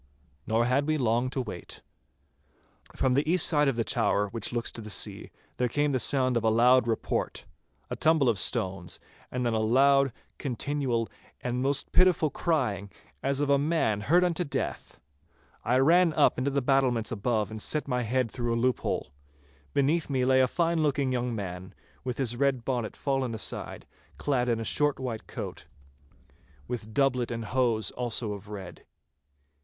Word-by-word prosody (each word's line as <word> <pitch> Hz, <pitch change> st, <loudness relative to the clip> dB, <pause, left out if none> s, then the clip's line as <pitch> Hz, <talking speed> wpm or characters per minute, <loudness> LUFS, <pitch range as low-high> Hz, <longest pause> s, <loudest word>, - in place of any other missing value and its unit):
Nor 115 Hz, +2 st, +2 dB
had 135 Hz, +4 st, +1 dB
we 155 Hz, 0 st, +1 dB
long 120 Hz, -1 st, +1 dB
to 135 Hz, -, -3 dB
wait. 90 Hz, -8 st, -7 dB, 1.1 s
From 130 Hz, -, +1 dB
the 145 Hz, +4 st, +2 dB
east 180 Hz, -2 st, +5 dB
side 150 Hz, -3 st, +3 dB
of 135 Hz, -, +1 dB
the 115 Hz, -, 0 dB
tower 105 Hz, -1 st, 0 dB
which 115 Hz, 0 st, -3 dB
looks 120 Hz, -1 st, -2 dB
to 115 Hz, -, -7 dB
the 110 Hz, -, -8 dB
sea, -, -, -3 dB, 0.3 s
there 125 Hz, -, +1 dB
came 145 Hz, +4 st, +1 dB
the 130 Hz, -, +1 dB
sound 130 Hz, -1 st, +3 dB
of 115 Hz, -, +1 dB
a 110 Hz, -, +4 dB
loud 120 Hz, +2 st, +5 dB
report, 110 Hz, -, -2 dB, 0.4 s
a -, -, -4 dB
tumble 155 Hz, -4 st, +3 dB
of 110 Hz, -5 st, +2 dB
stones, 90 Hz, -1 st, -2 dB, 0.3 s
and 125 Hz, -1 st, -2 dB
then 120 Hz, -, +1 dB
a 110 Hz, -, +1 dB
loud, 135 Hz, +4 st, +4 dB, 0.3 s
continual, 130 Hz, -3 st, -1 dB, 0.3 s
and 125 Hz, 0 st, -2 dB
most 140 Hz, +1 st, -1 dB
pitiful 180 Hz, -5 st, +4 dB
crying, 125 Hz, -, -1 dB, 0.3 s
as 135 Hz, 0 st, -1 dB
of 145 Hz, -1 st, +1 dB
a 140 Hz, -, +4 dB
man 145 Hz, -9 st, +1 dB
hurt 175 Hz, +10 st, +4 dB
unto 180 Hz, 0 st, +1 dB
death. 140 Hz, -4 st, -4 dB, 0.6 s
I 125 Hz, +3 st, +2 dB
ran 165 Hz, +5 st, +5 dB
up -, -, +3 dB
into 130 Hz, +2 st, 0 dB
the 140 Hz, -1 st, -1 dB
battlements 125 Hz, -4 st, +2 dB
above 110 Hz, -1 st, -1 dB
and 110 Hz, 0 st, -5 dB
set 150 Hz, +5 st, 0 dB
my 125 Hz, -2 st, 0 dB
head 120 Hz, 0 st, 0 dB
through 120 Hz, -2 st, -1 dB
a -, -, 0 dB
loophole. 125 Hz, -, -1 dB, 0.6 s
Beneath 150 Hz, -, +1 dB
me 130 Hz, -2 st, +1 dB
lay 130 Hz, 0 st, +4 dB
a 130 Hz, -, +4 dB
fine 170 Hz, +3 st, 0 dB
looking 140 Hz, -3 st, +1 dB
young 125 Hz, -1 st, -1 dB
man, 95 Hz, -3 st, -6 dB, 0.3 s
with 125 Hz, -2 st, -3 dB
his 120 Hz, -3 st, -1 dB
red 130 Hz, -2 st, 0 dB
bonnet 120 Hz, -4 st, -2 dB
fallen 135 Hz, -4 st, -1 dB
aside, 110 Hz, -, -5 dB, 0.3 s
clad 125 Hz, -4 st, 0 dB
in 115 Hz, -1 st, +1 dB
a -, -, -3 dB
short 145 Hz, +4 st, +1 dB
white 120 Hz, -4 st, -5 dB
coat, -, -, -7 dB, 1.0 s
with 110 Hz, -3 st, -5 dB
doublet 130 Hz, -1 st, +1 dB
and 115 Hz, -1 st, -4 dB
hose 115 Hz, -4 st, 0 dB
also 120 Hz, -3 st, -2 dB
of 100 Hz, 0 st, -9 dB
red. 100 Hz, -4 st, -9 dB
125 Hz, 175 wpm, -28 LUFS, 115-140 Hz, 1.1 s, east